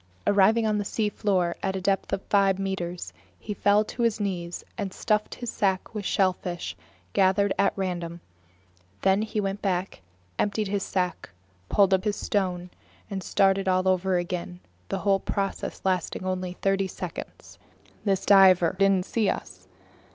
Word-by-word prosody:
Arriving 210 +3 +4
on 210 -1 +1
the - - -1
seafloor 200 -4 0
at 190 0 -1
a - - -1
depth 195 +1 0
of 195 -1 -1
about - - -32
five 195 -2 +4
meters, 185 -3 -4 0.3
he 210 - -5
fell 205 +1 +3
to 240 - -6
his 230 -2 +2
knees 175 -4 -3
and 195 - -3
stuffed 215 +2 0
his 240 -2 -5
sack 190 0 0
with 210 -2 -4
shellfish 180 - -1 0.4
gathered 195 +1 +3
at 200 - +4
random. 175 -3 -3 0.8
Then 195 +1 +4
he 215 0 -2
went 195 0 -2
back 190 -1 -1
up, - - -18 0.4
emptied 205 0 0
his 200 0 0
sack, 180 -2 -2 0.4
pulled 195 -2 +4
up 190 0 +2
his 210 -1 0
stone, 180 -4 -2 0.4
and 195 -1 -3
started 195 +1 +2
all 185 0 +2
over 185 0 +2
again, 175 0 -4 0.3
the - - -1
whole 195 -1 +2
process 195 +1 -3
lasting 185 0 -1
only 185 -1 -2
thirty 195 +1 0
seconds. 180 -2 -8 0.4
This 195 -2 0
diver 185 -4 +6
didn't 195 -2 +3
see 220 -4 +1
us. 95 -1 -5
195 Hz, 160 wpm, -26 LUFS, 185-200 Hz, 0.8 s, diver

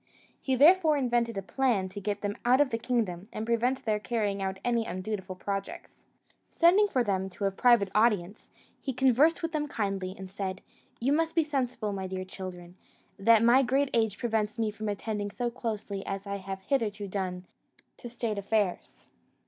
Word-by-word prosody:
He 265 - 0
therefore 315 +2 +6
invented 240 -4 0
a 195 - -3
plan 230 -3 +1
to 200 +2 -8
get 205 0 -2
them 205 0 -2
out 250 +2 +4
of 290 -2 +3
the 230 - -1
kingdom, 220 -6 -2
and 215 - -4
prevent 235 +3 0
their 215 -2 +1
carrying 205 -2 -1
out 190 0 -2
any 235 -1 +2
undutiful 185 0 -5
projects. 195 +1 -6 0.4
Sending 370 +5 +5
for 260 -11 +1
them 190 -3 -1
to 200 +2 -4
a 195 - +2
private 205 -1 +4
audience, 210 -3 +1 0.3
he 265 - -4
conversed 265 +7 +3
with 330 - -1
them 300 -2 -1
kindly, 195 -7 -3
and 190 - -7
said: 190 -1 -4 0.4
"You 265 +4 +1
must 325 +1 0
be 330 - +4
sensible, 255 -8 -2
my 190 -1 -4
dear 185 0 -4
children, 185 -1 -8 0.4
that 225 +2 +5
my 240 +3 +6
great 270 +2 +1
age 220 -3 +2
prevents 220 -2 -1
me 220 -2 0
from 215 0 -5
attending 205 0 -3
so 240 +3 -3
closely 215 -5 -4
as 195 +1 -4
I 200 0 -3
have 190 0 -7
hitherto 210 -5 -1
done 185 -2 -4 0.5
to 240 - -8
state 230 -3 -3
affairs. 200 -2 -2
215 Hz, 180 wpm, -29 LUFS, 195-245 Hz, 0.5 s, therefore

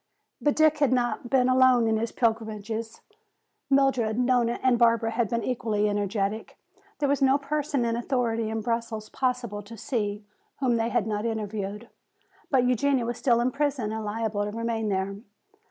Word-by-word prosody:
But 295 - +2
Dick 310 -1 +4
had 285 -4 +3
not 245 -1 0
been 255 -1 +3
alone 255 -2 +5
in 220 0 +2
his 225 +1 -2
pilgrimages. 220 -1 -2 0.7
Mildred, 265 -5 +2
Nona 245 -1 +2
and 250 -2 +3
Barbara 230 -1 +3
had 230 -2 0
been 235 -1 -1
equally 220 -4 0
energetic. 205 +1 -2 0.4
There 285 - 0
was 280 -1 +1
no 270 0 +5
person 285 -2 -1
in 230 0 0
authority 235 -2 -1
in 220 0 -2
Brussels 230 -1 -3
possible 250 -5 -2
to 220 +3 -11
see 210 -3 -3 0.3
whom 250 -4 +2
they 225 0 0
had 215 - +1
not 215 +1 -2
interviewed. 210 0 -4 0.6
But 260 -3 +3
Eugenia 250 +1 +2
was 240 0 -4
still 235 -3 +3
in 250 +2 +1
prison 275 -6 -1
and 220 0 -4
liable 215 -1 -2
to 205 - -3
remain 225 0 -2
there. 195 0 -2
230 Hz, 170 wpm, -26 LUFS, 220-255 Hz, 0.7 s, alone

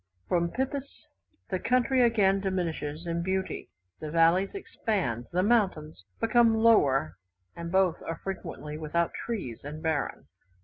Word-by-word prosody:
From 170 -1 +1
Pipis 270 +5 -4 0.5
the 185 - 0
country 255 +4 +2
again 205 -5 +4
diminishes 170 -5 -3
in 170 0 -1
beauty: 190 +1 -2 0.3
the 155 - -5
valleys 165 - +3
expand, 185 - -2
the 180 +1 +1
mountains 185 - +1
become 225 0 +4
lower, 140 - +3 0.4
and 170 0 -6
both 190 -3 +2
are 165 - -4
frequently 155 -5 -6
without 165 +2 0
trees, 185 - -4
and 150 +2 -7
barren. 160 -4 -1
180 Hz, 130 wpm, -28 LUFS, 155-220 Hz, 0.5 s, again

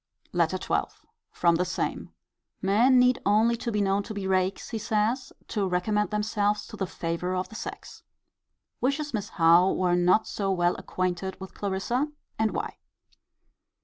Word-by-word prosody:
LETTER - - +2
XII. - - -2 0.3
From 170 -1 +2
the 180 - +2
same. 180 - -3 0.5
Men 225 +7 +4
need 250 0 +4
only 220 +3 +3
be 230 -3 -2
known 195 0 +2
to 215 +1 -7
be 200 -1 -4
rakes, 190 0 0
he 225 - -2
says, 220 +4 0 0.2
to 205 -4 0
recommend 210 +4 0
themselves 210 -1 0
to 220 - -8
the 195 -3 -2
favour 175 +2 -3
of 185 0 -2
the 220 - -12
sex. - - -7 0.8
Wishes 285 +3 -1
Miss 210 -3 -2
Howe 170 +2 +5
were 180 -1 +1
not 180 +5 +3
so 195 -2 -1
well 175 -1 +2
acquainted 185 +1 -3
with 190 0 -9
Clarissa: 205 +8 -1 0.3
and 220 0 +3
why. - - -4
200 Hz, 155 wpm, -27 LUFS, 185-220 Hz, 0.8 s, Howe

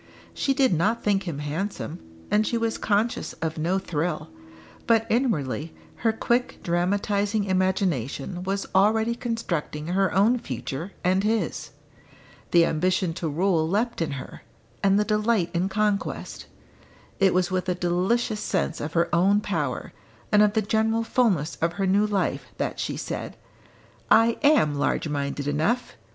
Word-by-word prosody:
She 275 - 0
did 265 -6 +3
not 205 +8 +1
think 200 -2 +1
him 160 -5 -3
handsome, 160 +3 -4 0.3
and 215 +1 +3
she 235 - 0
was 230 -1 -1
conscious 215 +3 0
of 160 -1 -4
no 175 +5 +1
thrill. 165 - -3 0.6
But 225 -1 +4
inwardly 165 - 0 0.2
her 225 - +2
quick 240 +2 0
dramatising 200 +4 0
imagination 185 - -1
was 195 +2 -2
already 220 +4 +3
constructing 175 -10 -3
her 195 +2 +2
own 220 +6 +3
future 140 - -5
and 185 +2 +2
his. 220 +1 -1 0.8
The 170 -1 +5
ambition 175 +2 0
to 165 -1 -3
rule 165 0 +1
leapt 225 +3 0
in 160 -3 -1
her, 135 - -8 0.4
and 195 +1 +4
the 210 - +2
delight 210 -4 +1
in 180 +3 0
conquest. 210 0 -2 0.7
It 195 -1 +5
was 185 0 +1
with 185 0 -1
a 180 - +1
delicious 185 +6 0
sense 175 -5 -1
of 150 +2 -4
her 170 0 +2
own 195 +4 +4
power, 165 -11 -3 0.4
and 210 - +6
of 210 -1 +4
the 220 -1 +1
general 220 +2 +1
fulness 205 - +1
of 165 +1 0
her 195 +1 -1
new 200 +3 +3
life, 205 -2 -1
that - - -3
she - - -2
said, - - -5 0.7
"I 230 0 +5
am 285 - +4
large 145 +2 0
minded 140 -1 -3
enough! 160 +13 0
190 Hz, 150 wpm, -25 LUFS, 165-215 Hz, 0.8 s, and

